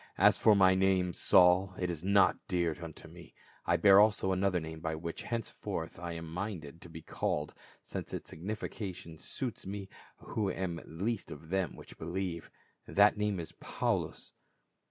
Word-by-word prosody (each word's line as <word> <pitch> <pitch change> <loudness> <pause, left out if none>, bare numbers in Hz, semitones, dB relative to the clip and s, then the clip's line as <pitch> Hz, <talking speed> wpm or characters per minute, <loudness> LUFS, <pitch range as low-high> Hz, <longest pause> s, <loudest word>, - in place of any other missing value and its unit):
"As - - +6
for 110 - +5
my 95 -1 +6
name, 95 -1 +2
Saul, 90 +2 +5
it 90 -1 -1
is 85 -1 -6
not 100 +1 +5
dear 85 -4 0
unto 80 0 -9
me; 85 -1 -14 0.3
I - - +4
bear 100 -1 +7
also 105 -2 +4
another 95 -1 +1
name 80 0 -7
by 80 -1 -2
which 85 +1 -5
henceforth 115 -3 -4
I 85 -1 -5
am 85 0 -6
minded 85 -3 -6
to 85 - -11
be 80 -1 -10
called, - - -2 0.3
since - - -6
its - - -6
signification 95 -2 -6
suits 120 -7 -5
me, 100 -1 -5 0.3
who 105 -3 -2
am 90 -3 -3
least 100 +7 -3
of 80 +2 -10
them 95 -1 -1
which - - -13
believe; 85 0 -4 0.4
that 105 +1 +5
name 105 -2 -1
is 80 - -6
Paulus." - - -3
90 Hz, 165 wpm, -32 LUFS, 85-100 Hz, 0.4 s, bear